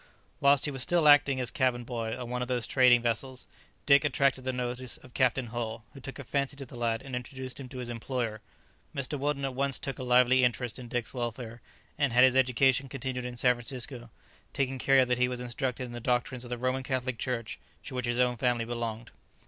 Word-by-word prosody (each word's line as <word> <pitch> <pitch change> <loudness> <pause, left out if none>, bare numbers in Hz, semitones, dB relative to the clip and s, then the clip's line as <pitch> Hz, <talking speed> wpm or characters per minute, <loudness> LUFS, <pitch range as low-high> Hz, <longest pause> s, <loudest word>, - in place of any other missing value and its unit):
Whilst 140 0 +4
he 150 - -1
was 135 -2 -5
still 170 +2 +3
acting 145 -2 +6
as 125 -2 -1
cabin 125 -2 +1
boy 115 -1 -4
on 125 - -5
one 125 +1 -3
of 125 - -2
those 125 -3 -1
trading 125 -3 +5
vessels, 125 +2 -2 0.4
Dick 140 0 +6
attracted 135 -2 +1
the 130 - 0
notice 125 0 -3
of 125 - -17
Captain 130 -1 +2
Hull, 115 -1 -5
who 135 - -11
took 135 +1 -8
a 140 - -7
fancy 140 +2 -1
to 135 - -6
the 125 - -12
lad 115 -1 -1
and 135 -2 -5
introduced 130 +1 -6
him 130 -2 -8
to 130 - -9
his 125 -1 -4
employer. 115 -2 -3 0.5
Mr. 140 +1 -2
Weldon 140 0 -1
at 135 - -3
once 135 +1 0
took 135 - -5
a - - -4
lively 125 +1 +4
interest 125 0 0
in 125 - -8
Dick's 120 -1 -3
welfare, 120 -1 -5 0.4
and 140 -5 +2
had 125 +1 +6
his 130 0 +5
education 130 +1 +3
continued 130 -1 -4
in 125 -1 -6
San 125 +1 +4
Francisco, 120 0 -6 0.4
taking 135 -2 -1
care 135 0 +5
that 125 0 0
he 125 - +4
was 125 -1 -4
instructed 125 +1 -3
in 125 - -7
the 120 - -6
doctrines 125 +1 -1
of 120 - -9
the 120 - -3
Roman 130 +2 -1
Catholic 130 -2 -2
Church, 120 -4 -3 0.2
to - - -8
which 125 -1 -2
his 120 0 0
own 125 -1 +2
family 120 -1 +1
belonged. 115 -1 -4
125 Hz, 225 wpm, -29 LUFS, 120-130 Hz, 0.5 s, acting